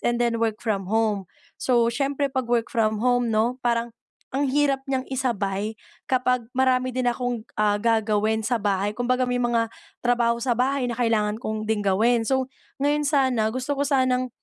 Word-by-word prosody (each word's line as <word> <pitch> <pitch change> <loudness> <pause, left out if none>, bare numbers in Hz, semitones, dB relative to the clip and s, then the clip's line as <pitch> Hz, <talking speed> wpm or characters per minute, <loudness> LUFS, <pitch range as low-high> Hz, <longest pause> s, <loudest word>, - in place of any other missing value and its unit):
and 240 0 +1
then 235 -1 0
work 225 0 -1
from 195 -4 -1
home. 210 -3 0 0.3
So 235 -2 +2
siyempre 275 +1 -1
‘pag 260 -3 -2
work 235 -1 0
from 220 -1 +1
home 245 -1 +2
‘no, 230 +3 0
parang 235 -1 0 0.4
ang 275 +2 -1
hirap 275 0 +1
niyang 265 -1 -2
isabay 215 -6 -1 0.3
kapag 250 -1 +1
marami 255 0 +2
din 255 0 0
akong, 245 -2 -3
ah, 210 -1 +2
gagawin 220 -1 +1
sa 240 0 0
bahay. 200 0 0
Kumbaga 250 +3 0
may 250 0 -1
mga 235 -2 0 0.3
trabaho 240 -1 +2
sa 240 +1 0
bahay 255 +3 +1
na 245 - -1
kailangan 225 -2 0
kong 215 -2 -3
ding 215 -1 0
gawin. 225 +4 +2
So 265 -1 +2 0.3
ngayon 290 +1 +1
sana, 260 -6 +2
gusto 255 +5 -3
ko 285 0 -1
sanang, 255 -2 +2
240 Hz, 175 wpm, -24 LUFS, 220-255 Hz, 0.4 s, So